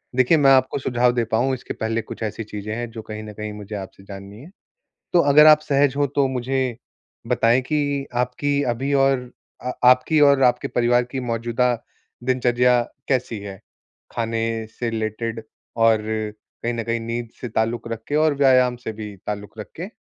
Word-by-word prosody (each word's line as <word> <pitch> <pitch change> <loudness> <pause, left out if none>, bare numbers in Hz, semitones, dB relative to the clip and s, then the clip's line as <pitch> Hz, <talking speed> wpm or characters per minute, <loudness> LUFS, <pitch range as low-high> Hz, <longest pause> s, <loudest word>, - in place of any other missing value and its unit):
देखिए 130 +6 +4
मैं 135 -2 +5
आपको 130 +1 +3
सुझाव 125 -1 +2
दे 120 -1 +1
पाऊँ, 120 +4 +1
इसके 125 - -5
पहले 115 +1 -2
कुछ 110 - -8
ऐसी 110 +1 -3
चीज़ें 105 0 -6
हैं 120 0 -4
जो 110 -1 -7
कहीं 110 0 -8
न 105 -1 -9
कहीं 105 0 -6
मुझे 105 0 -8
आपसे 95 -1 -8
जाननी 100 +2 -10
हैं। 170 +6 -13 0.6
तो 175 - +5
अगर 150 +1 +8
आप 155 0 +8
सहज 140 -2 +2
हो 145 -1 +2
तो 140 -2 +3
मुझे 130 -1 -2 0.5
बताएँ 120 0 +3
कि 145 0 -1
आपकी 140 +4 0
अभी 135 +4 -2
और 135 -2 +2 0.3
अ, 125 - -3
आपकी 130 +5 +5
और 140 -2 +5
आपके 125 - +2
परिवार 120 0 +2
की 135 - -3
मौजूदा 120 +1 0 0.5
दिनचर्या 125 -1 +3 0.3
कैसी 125 -4 -1
है? 100 -1 -8 0.5
खाने 115 -1 -2
से 120 - -1
रिलेटेड 115 0 -3 0.3
और 115 -1 +4 0.6
कहीं 120 +1 0
न 115 -1 -3
कहीं 115 +1 -1
नींद 115 0 -4
से 125 - -4
ताल्लुक 115 +2 -1
रख 115 -1 -5
के 145 - -1
और 155 -1 +3
व्यायाम 130 -3 +4
से 115 -2 -6
भी 105 -2 -8
ताल्लुक 105 +1 -6
रख 105 - -7
के? 175 +4 -5
120 Hz, 185 wpm, -22 LUFS, 110-130 Hz, 0.6 s, अगर